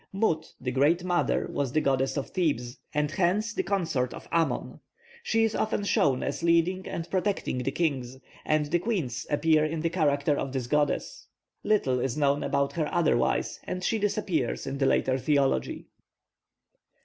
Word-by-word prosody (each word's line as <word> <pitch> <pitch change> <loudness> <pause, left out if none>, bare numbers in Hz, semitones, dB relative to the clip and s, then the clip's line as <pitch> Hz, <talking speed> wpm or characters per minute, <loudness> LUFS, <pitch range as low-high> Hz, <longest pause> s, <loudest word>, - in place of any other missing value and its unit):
+Mut+, 180 -6 0
the 125 0 -3
great 150 +7 +2
mother, 175 -1 +1
was 140 -3 -1
the 155 - +3
goddess 135 -1 +1
of 140 - -4
Thebes, 130 -9 -1
and 150 0 0
hence 195 +6 +1
the - - 0
consort 160 -11 -1
of - - -11
Amon. 165 -1 0 0.4
She 225 - +1
is 225 -1 +1
often 215 -2 -1
shown 140 -9 +2
as 140 - -3
leading 170 +2 +2
and 165 0 -4
protecting 190 -8 -1
the 125 - -1
kings, 135 -6 -1 0.3
and 155 -1 +1
the 170 +4 +1
queens 165 - -2
appear 155 +1 +3
in 155 +1 -2
the 165 0 0
character 145 -4 +2
of 135 -1 -3
this 130 -3 -2
goddess. 150 - -1 0.4
Little 135 -12 +2
is 130 +2 -2
known 145 -1 +2
about 140 0 0
her 155 -3 -1
otherwise, 170 -3 +1
and 185 0 -4
she 220 +4 +1
disappears 190 - -1
in 135 0 -4
the 135 - +3
later 130 0 +2
theology. 135 - 0
155 Hz, 170 wpm, -27 LUFS, 135-175 Hz, 0.4 s, the